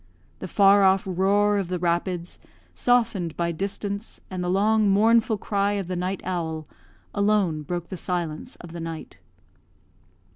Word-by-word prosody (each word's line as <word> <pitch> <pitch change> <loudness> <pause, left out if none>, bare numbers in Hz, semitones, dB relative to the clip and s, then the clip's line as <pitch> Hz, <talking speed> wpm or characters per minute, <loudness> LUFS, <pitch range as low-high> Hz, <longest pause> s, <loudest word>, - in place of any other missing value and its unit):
The - - -5
far 200 +1 +5
off 190 0 +4
roar 200 +3 +2
of 195 - -2
the 180 0 -2
rapids, 175 0 -2 0.3
softened 225 -9 +1
by 170 0 0
distance, 200 +4 -4
and 185 -1 -3
the 180 - -1
long, 210 +2 +3
mournful 220 +2 +4
cry 200 0 0
of 200 -3 -3
the 185 - -3
night 185 +2 -2
owl, 160 -4 -3 0.5
alone 200 -6 +1
broke 175 +3 -5
the 185 - -5
silence 170 -4 -3
of 175 - -12
the 170 - -7
night. 165 -1 -7
190 Hz, 150 wpm, -25 LUFS, 175-205 Hz, 0.5 s, far